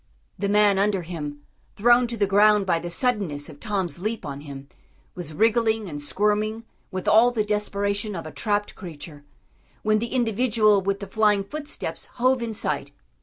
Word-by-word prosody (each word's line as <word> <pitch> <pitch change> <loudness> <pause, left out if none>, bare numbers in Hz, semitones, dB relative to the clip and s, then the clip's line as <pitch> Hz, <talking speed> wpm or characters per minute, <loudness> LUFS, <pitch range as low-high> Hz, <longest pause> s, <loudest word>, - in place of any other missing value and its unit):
The 200 +1 -1
man 205 -1 +4
under 200 -2 +1
him, 150 -4 -6 0.3
thrown 240 +3 +4
to 235 0 -5
the 205 - +2
ground 205 +1 +4
by 170 -3 +1
the 175 - -6
suddenness 180 - 0
of 145 -2 -12
Tom's 190 -7 -2
leap 215 0 -3
on 140 -1 -6
him, 140 -2 -9 0.5
was 175 -4 -5
wriggling 220 +3 +2
and 145 -4 -6
squirming 210 +7 0 0.3
with 185 -2 -5
all 225 +3 +6
the 230 -3 0
desperation 205 0 -1
of 165 - -6
a 155 - -7
trapped 205 +2 -1
creature, 155 -5 -10 0.6
when 215 0 +3
the 235 - -2
individual 225 -3 +3
with 195 +1 -2
the 200 - -5
flying 210 0 +2
footsteps 295 +8 -6
hove 255 +1 +2
in 230 -1 -3
sight. 215 - -2
205 Hz, 170 wpm, -24 LUFS, 175-220 Hz, 0.6 s, all